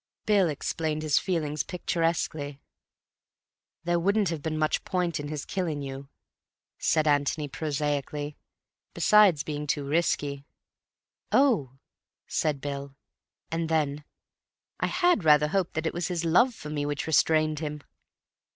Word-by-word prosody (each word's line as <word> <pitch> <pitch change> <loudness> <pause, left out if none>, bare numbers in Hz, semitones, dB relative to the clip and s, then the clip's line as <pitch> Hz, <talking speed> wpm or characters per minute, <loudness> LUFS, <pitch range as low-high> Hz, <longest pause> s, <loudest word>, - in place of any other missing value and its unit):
Bill 200 -5 +4
explained 155 +1 -2
his 150 -2 +3
feelings 155 -5 -1
picturesquely. 165 -5 -2 1.2
"There 175 0 +1
wouldn't 200 +2 +2
have 165 -3 -3
been 155 +1 -2
much 155 0 0
point 175 -4 -1
in 145 - -5
his 150 -1 -5
killing 165 -7 -2
you," 135 0 -7 0.7
said 155 -1 +2
Antony 145 +1 +1
prosaically. 145 0 -2 0.6
"Besides 205 -8 +5
being 150 -1 -4
too 145 0 -1
risky." 145 -2 0 0.9
"Oh!" 230 - +3 0.5
said 150 -3 -1
Bill. 140 -1 -5 0.6
And 165 0 -1
then, 150 -2 0 0.8
"I - - +1
had 355 - +2
rather 150 -1 +5
hoped 185 0 -1
that 160 +1 -2
it 160 - -1
was 175 0 -2
his 175 -2 -2
love 235 +10 +4
for 150 - -8
me 145 -1 -2
which 145 -1 -2
restrained 155 -1 +3
him." 150 -2 -5
155 Hz, 135 wpm, -27 LUFS, 145-170 Hz, 1.2 s, Besides